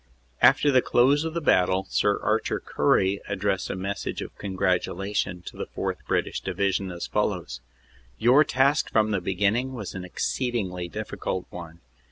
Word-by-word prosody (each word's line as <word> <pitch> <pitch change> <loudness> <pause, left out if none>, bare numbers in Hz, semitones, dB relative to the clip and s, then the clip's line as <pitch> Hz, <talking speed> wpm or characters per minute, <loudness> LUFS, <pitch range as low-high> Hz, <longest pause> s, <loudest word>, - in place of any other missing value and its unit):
After 145 - +5
the 130 -2 +5
close 135 +6 +3
of 160 0 -4
the 170 - -1
battle 95 - +3
Sir 100 0 +1
Arthur - - 0
Currie 95 +1 +1
addressed 100 -1 -1
a - - -2
message 95 +2 -4
of - - -10
congratulation 95 -1 -1
to - - -9
the - - -4
4th. - - -3
British - - -1
Division, 100 -1 -1
as 85 -1 -5
fol - - +1
lows: 60 -1 -6 0.6
"Your 125 - +5
task 140 +1 +2
from 110 -1 +2
the 100 -3 0
beginning 100 +8 0
was 105 -7 -6
an 90 - -6
exceedingly 95 -2 -2
difficult 90 +2 -4
one. 85 -1 -9
100 Hz, 160 wpm, -26 LUFS, 90-120 Hz, 0.6 s, After